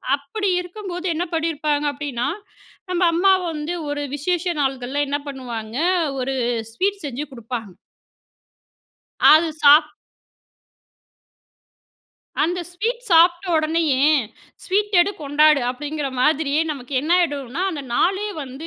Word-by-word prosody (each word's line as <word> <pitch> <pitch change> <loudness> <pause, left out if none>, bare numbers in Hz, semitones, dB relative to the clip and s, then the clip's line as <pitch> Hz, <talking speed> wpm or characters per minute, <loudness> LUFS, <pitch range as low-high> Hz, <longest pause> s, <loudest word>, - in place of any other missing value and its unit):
அப்டி 385 +9 -3
இருக்கும்போது 360 -1 -7
என்ன 335 +3 -2
பண்ணிருப்பாங்க 305 -2 0
அப்டின்னா, 275 -3 -3 0.6
நம்ம 360 0 -1
அம்மா 380 +3 +4 0.2
வந்து 305 +3 -4
ஒரு 290 0 -3
விசேஷ 350 +4 -1 0.2
நாள்கள்ல 270 +1 -1
என்ன 290 - -1
பண்ணுவாங்க, 240 -2 -6 0.4
ஒரு 265 +1 -2 0.4
ஸ்வீட் 395 +5 -1
செஞ்சு 280 +1 -4
குடுப்பாங்க. 230 -5 -7 1.6
அது 320 +2 +5
சாப் 300 +1 +7 2.5
அந்த 355 +3 0
ஸ்வீட் 470 +7 -3
சாப்ட்ட 345 +2 +5
உடனேயே, 310 -3 +1 0.6
"ஸ்வீட் 410 +2 0
எடு 350 - +2
கொண்டாடு." 295 +1 +4
அப்டிங்கற 295 +2 -4
மாதிரியே 300 +1 +2
நமக்கு 270 -2 -7
என்ன 305 +4 -5
ஆகிடும்னா 285 -1 -2
அந்த 295 -5 -5
நாளே 390 +7 +1
வந்து, 270 +4 -8
300 Hz, 110 wpm, -21 LUFS, 275-350 Hz, 2.5 s, சாப்